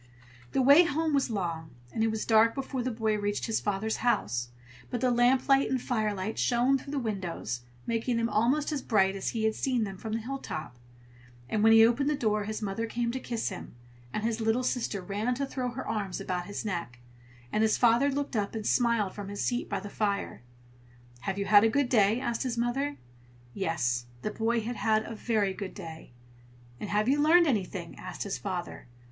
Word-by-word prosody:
The 265 - +3
way 285 +6 +8
home 320 0 0
was 275 -2 +2
long, 170 -7 -3 0.2
and 220 - 0
it - - +3
was 220 0 -2
dark 225 0 +5
before 270 -1 -3
the 250 - -1
boy 220 -2 0
reached 205 0 -1
his 225 - 0
father's 210 +2 -1
house; 120 - 0 0.4
but 245 - -2
the 250 +1 +2
lamplight 260 +3 +4
and 260 - +1
firelight 215 -4 -2
shone 250 +3 +3
through 280 - -11
the - - -1
windows, 185 - -3 0.2
making 230 +1 0
them 230 0 +1
almost 250 +8 +1
as 290 -3 -2
bright 195 -5 +2
as 195 - -2
he 225 -2 -2
had 220 0 +2
seen 250 0 0
them 195 -2 -5
from 220 +1 -5
the 225 - 0
hilltop; 225 - -5 0.7
and 210 - 0
when 225 +1 +6
he 225 0 +8
opened 275 +5 +2
the 300 - +1
door, 215 -5 0
his 215 +1 -4
mother 210 +3 -2
came 235 +1 -1
to 260 - -3
kiss 235 -3 -2
him, 185 - -8 0.4
and 215 - -3
his 230 0 -1
little 225 +3 +1
sister 230 -5 -1
ran 210 +6 -1
to 275 +2 -1
throw 255 -2 -3
her 255 +2 -6
arms 205 -4 -2
about 180 -1 -3
his 205 +2 -5
neck, 170 - -3 0.5
and 215 - +1
his 220 -1 +3
father 240 +4 +4
looked 280 -1 -2
up 205 0 -1
and 215 -1 -4
smiled 235 -5 +2
from 205 -2 -7
his 200 0 -4
seat 245 -1 -1
by - - -1
the - - -8
fire. 200 -1 -2 0.8
"Have 195 +9 -3
you 200 - -1
had 205 0 +7
a 225 - +5
good 270 +2 +1
day?" 215 -1 +4
asked 235 -3 -2
his 250 -3 -2
mother. 270 +5 -1 0.6
Yes, 125 -10 -1 0.2
the 215 - -1
boy 230 +2 0
had 235 +2 -4
had 220 -1 +2
a 230 - -7
very 215 -3 0
good 190 0 -6
day. 160 -1 -9 0.7
"And 210 - -5
have 210 +2 +1
you 285 +3 +3
learned 340 +3 +6
anything?" 190 - -2
asked - - -5
his 200 - -4
father. 180 -9 -5
225 Hz, 210 wpm, -29 LUFS, 200-245 Hz, 0.8 s, way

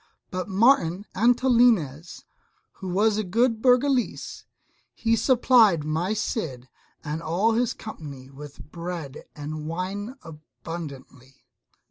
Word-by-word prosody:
But 185 +2 -4
Martin 195 -3 +3
Antolinez, 230 - +2 0.5
who 190 - -7
was 205 +4 +2
a - - 0
good 225 +4 +1
Burgalese, 255 0 +1 0.5
he 230 -1 +1
supplied 230 - +4
my 160 +6 -1
Cid 140 - -3 0.4
and 155 +1 -4
all 180 +8 +1
his 235 +1 0
company 145 -11 -9
with 145 +1 -12
bread 170 -5 -6
and 150 +1 -6
wine 195 +8 -4
abundantly. 150 -5 -10
180 Hz, 105 wpm, -25 LUFS, 155-230 Hz, 0.5 s, supplied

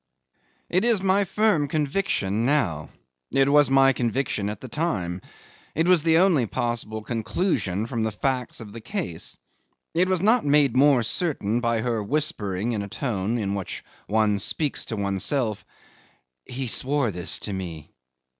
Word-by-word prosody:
'It 185 +3 +2
is 235 -3 +3
my 195 +1 +3
firm 205 -7 +2
conviction 140 - -1
now; 120 - +1 0.4
it 135 0 +3
was 145 0 +5
my 135 0 +5
conviction 120 -4 -1
at 105 -1 -5
the 130 - -8
time; 100 - -2 0.5
it 165 +3 +1
was 180 -3 +5
the 160 +1 +3
only 170 -10 +3
possible 110 -1 -3
conclusion 110 - -1
from 115 -1 -3
the 110 0 0
facts 125 +3 -2
of 105 -3 -9
the 115 - -8
case. 120 - -4 0.6
It 180 +3 +2
was 185 -1 +2
not 225 +4 +4
made 145 -3 +3
more 135 -2 +5
certain 115 - 0
by 115 -2 +1
her 115 -2 -1
whispering 105 -5 -1
in 110 -3 -2
a 100 - -5
tone 110 -2 -2
in 100 -3 -2
which 100 -2 -5 0.2
one 105 -1 +2
speaks 145 +8 0
to 115 - -4
oneself, 100 +3 -1 0.8
"He 130 +2 -4
swore 130 0 0
this 90 -2 -1
to 105 - -5
me." 85 -5 -6
120 Hz, 155 wpm, -24 LUFS, 105-150 Hz, 0.8 s, was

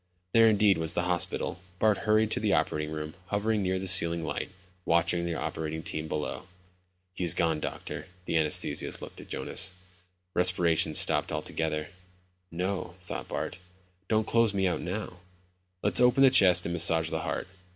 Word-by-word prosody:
There 115 -1 +6
indeed 105 -3 +3
was 80 +1 -1
the 90 - 0
hospital. 90 0 -2 0.2
Bart 110 0 +2
hurried 110 0 +3
to - - +1
the - - +1
operating 75 0 0
room, 75 0 -5
hovering 105 +2 0
near 95 -1 0
the 95 - -5
ceiling 85 -3 +5
light, - - -4 0.3
watching 85 +1 +1
the 85 - -3
operating 80 0 -4
team 80 0 -3
below. 75 +5 -4 0.7
"He's 90 -4 +2
gone, 80 -2 +1
doctor." - - -6 0.2
The - - -3
anesthetist 80 -2 +1
looked - - -10
at - - -14
Jonas. 95 0 -2 0.6
"Respiration's 85 -4 +3
stopped - - +3
altogether." 75 0 -3 0.6
No, 90 0 -4
thought 90 - -7
Bart. - - -5 0.5
Don't 110 -1 +1
close 115 -3 +2
me 95 -1 +1
out 90 - 0
now. 90 0 -5 0.6
"Let's - - +4
open 125 +2 +5
the 135 - +7
chest 90 -7 +5
and 85 - -3
massage 80 -1 +2
the - - -1
heart." - - -4
90 Hz, 160 wpm, -28 LUFS, 80-100 Hz, 0.7 s, the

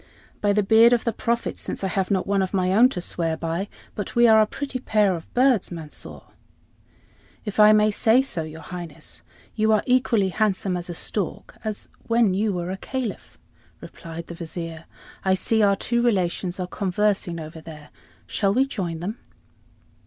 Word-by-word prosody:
"By 205 - +3
the 210 +1 +2
beard 225 +4 +6
of 240 - +2
the 230 - -1
Prophet, 235 +1 -2
since - - -4
I - - +1
have 190 0 -1
not 190 -2 +1
one 200 0 +1
of 190 +1 -2
my 185 0 +1
own 240 +5 +6
to 180 - -4
swear 165 -2 -2
by, 170 +4 -2 0.3
but 205 - -5
we 240 0 +6
are 220 -1 +7
a 215 - +3
pretty 270 +2 -4
pair 210 -5 +2
of 165 - -10
birds, 250 -5 +3
Mansor!" 160 -3 -8 1.2
"If 210 0 -4
I 210 0 +8
may 215 0 +4
say 225 +5 +4
so, 180 -11 -2
your 160 0 -8
Highness, 175 +1 -8 0.3
you 220 0 +2
are 215 - +3
equally 245 -6 +2
handsome 195 -2 0
as 175 0 -5
a 175 - -4
stork 195 +1 -3
as 215 -2 -4 0.2
when 230 -4 +3
you 205 +3 +1
were 180 -1 -3
a 190 - -4
Caliph," 250 +1 -5 0.4
replied 165 0 -9
the - - -8
Vizier. 165 -1 -7 0.4
"I 190 0 +3
see 220 +3 +1
our 200 -1 +4
two 235 +4 0
relations 185 -5 0
are 180 - -1
conversing 190 -2 -1
over 160 0 -8
there; 150 -2 -11 0.4
shall 200 0 0
we 265 - +4
join 175 -11 -4
them?" 205 +7 -4
195 Hz, 185 wpm, -24 LUFS, 175-220 Hz, 1.2 s, I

